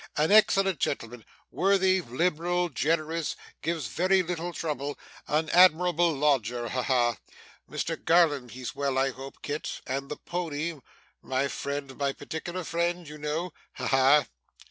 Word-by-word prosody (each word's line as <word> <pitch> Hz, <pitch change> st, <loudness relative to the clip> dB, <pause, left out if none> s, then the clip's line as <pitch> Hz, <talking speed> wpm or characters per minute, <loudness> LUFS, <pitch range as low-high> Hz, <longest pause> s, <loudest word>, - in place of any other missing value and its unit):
An 155 Hz, +5 st, +2 dB
excellent 195 Hz, -4 st, +5 dB
gentleman 115 Hz, -3 st, -3 dB, 0.3 s
worthy, 190 Hz, 0 st, +3 dB
liberal, 175 Hz, +5 st, 0 dB
generous, 160 Hz, +2 st, -1 dB, 0.3 s
gives 165 Hz, -3 st, -2 dB
very 185 Hz, -, +2 dB
little 175 Hz, 0 st, -3 dB
trouble 145 Hz, -3 st, -3 dB, 0.3 s
an 155 Hz, +2 st, +1 dB
admirable 175 Hz, -1 st, +5 dB
lodger. 125 Hz, -5 st, +1 dB
Ha 125 Hz, -, -1 dB
ha! 120 Hz, -3 st, +2 dB, 0.5 s
Mr -, -, -3 dB
Garland 160 Hz, -7 st, +3 dB
he's 125 Hz, +1 st, -6 dB
well 140 Hz, -2 st, -1 dB
I 135 Hz, 0 st, +2 dB
hope, 135 Hz, +1 st, -11 dB
Kit 150 Hz, +1 st, -4 dB
and 135 Hz, +1 st, -3 dB
the 150 Hz, -, -5 dB
pony 165 Hz, -2 st, -4 dB, 0.4 s
my 135 Hz, +1 st, 0 dB
friend, 140 Hz, -1 st, -4 dB
my 140 Hz, -1 st, 0 dB
particular 175 Hz, +5 st, -5 dB
friend 170 Hz, +1 st, -1 dB
you 150 Hz, +1 st, -9 dB
know. 155 Hz, +3 st, -3 dB, 0.2 s
Ha -, -, -3 dB
ha! 135 Hz, +2 st, +5 dB
150 Hz, 140 wpm, -28 LUFS, 135-175 Hz, 0.5 s, excellent